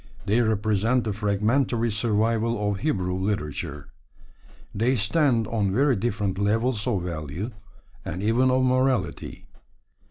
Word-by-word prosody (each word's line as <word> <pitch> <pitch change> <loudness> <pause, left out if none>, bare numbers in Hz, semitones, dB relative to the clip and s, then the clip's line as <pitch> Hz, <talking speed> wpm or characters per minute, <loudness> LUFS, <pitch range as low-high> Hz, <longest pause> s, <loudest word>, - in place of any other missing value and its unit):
They 110 +5 +2
represent 110 +2 +1
the 110 - -2
fragmentary 115 +4 0
survival 115 +1 +1
of 100 - -4
Hebrew 95 -11 -1
literature. 75 -7 -3 0.8
They 115 +5 +1
stand 120 +1 +2
on 105 -3 -1
very 135 +5 +3
different 100 -3 -2
levels 110 +3 0
of 100 -8 0
value, 85 - -5 0.5
and 90 +5 -5
even 120 +4 +3
of 130 0 +2
morality. 130 0 0
110 Hz, 120 wpm, -25 LUFS, 100-120 Hz, 0.8 s, very